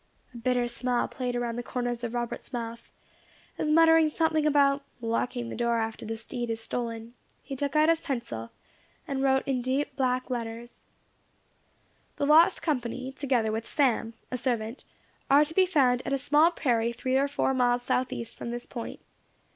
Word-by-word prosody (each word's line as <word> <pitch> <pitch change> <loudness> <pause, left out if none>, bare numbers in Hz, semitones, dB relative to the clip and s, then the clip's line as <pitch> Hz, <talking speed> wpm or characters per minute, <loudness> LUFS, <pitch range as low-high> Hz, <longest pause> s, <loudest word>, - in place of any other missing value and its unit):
A - - -9
bitter 245 +1 +1
smile 240 +1 -1
played 250 -1 -3
around 240 -1 -2
the - - -1
corners 245 -1 -3
of 235 0 -3
Robert's 240 +1 -4
mouth, 235 -2 -5 0.7
as 305 - 0
muttering 325 0 +6
something 315 -1 +1
about 280 -1 +4 0.2
"locking 240 +1 -2
the - - -5
door 235 0 +1
after 225 -1 -3
the 225 0 -3
steed 240 +1 -5
is 225 0 -2
stolen," 230 0 -4 0.3
he 275 - -6
took 280 +2 -2
out 305 +1 +5
his 330 0 +3
pencil, 235 - -4 0.6
and 275 -2 -2
wrote 265 0 +2
in 260 -2 0
deep 260 +4 -1
black 255 -1 0
letters, 235 0 -6 1.3
"The 285 - 0
lost 325 +5 +5
company, 255 -3 -2
together 255 -5 0
with 225 +1 -3
Sam, 235 -5 +1 0.2
a 250 - -2
servant, 235 -1 -2 0.4
are 285 +2 +6
to 310 - -6
be 370 +1 +4
found 255 -8 +3
at - - -2
a - - +3
small 295 +5 +4
prairie 235 -8 0
three 255 +2 -1
or 275 +1 +3
four 280 -1 0
miles 245 -1 +2
south 255 +1 0
east 230 -1 -5
from - - -6
this 240 0 -5
point. 235 -3 -7
250 Hz, 180 wpm, -28 LUFS, 235-280 Hz, 1.3 s, muttering